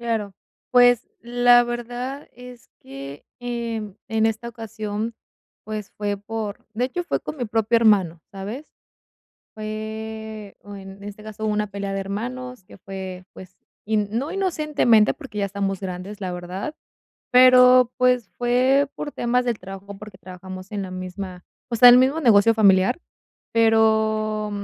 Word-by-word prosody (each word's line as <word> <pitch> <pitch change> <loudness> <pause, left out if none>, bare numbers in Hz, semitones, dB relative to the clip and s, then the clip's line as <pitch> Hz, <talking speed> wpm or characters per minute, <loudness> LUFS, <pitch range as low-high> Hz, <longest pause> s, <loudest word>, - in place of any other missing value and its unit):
Claro. 225 -4 -2 0.4
Pues, 245 -1 +5
la 245 0 +5
verdad 245 +3 -5
es 250 0 -13
que, 135 +1 -10
em, 230 -4 -4
en 220 0 +1
esta 225 +1 -2
ocasión, 220 -1 -5 0.5
pues, 215 -1 -6
fue 205 -1 -3
por 210 0 -6
de 240 +3 0
hecho 350 +7 -4
fue - - -1
con 300 - -7
mi 245 - -2
propio 225 +1 +1
hermano, 195 -8 +3
¿sabes? 210 +9 -7 0.9
Fue 220 0 -6
o 205 0 -10
en 195 0 -11
este 205 +1 -9
caso, 215 0 -6
hubo 215 - +1
una 210 0 0
pelea 200 0 -5
de 195 - -2
hermanos 245 +4 -5
que - - -15
fue, 190 -1 -7
pues, 185 0 -13 0.3
in 210 -1 0
no 250 +7 -2
inocentemente, 305 - +2
porque 270 -9 -10
ya 200 - +1
estamos 195 -1 -2
grandes, 190 +2 -6
la 185 -3 -4
verdad, 180 - -6 0.6
pero, 250 -1 +7
pues, 250 -4 +2
fue 255 +3 +3
por 290 - -6
temas 245 +1 0
del 240 -3 -1
trabajo, 195 +1 -10
porque 210 -1 -11
trabajamos 185 +1 -10
en 205 -1 -2
la 190 - -6
misma 185 0 -7 0.3
o 235 - -1
sea, 245 +2 +10
en 245 - +8
el - - +7
mismo 270 +5 +2
negocio 230 -4 +5
familiar. 200 - +4 0.5
Pero, 220 -1 +2
220 Hz, 155 wpm, -23 LUFS, 200-245 Hz, 0.9 s, sea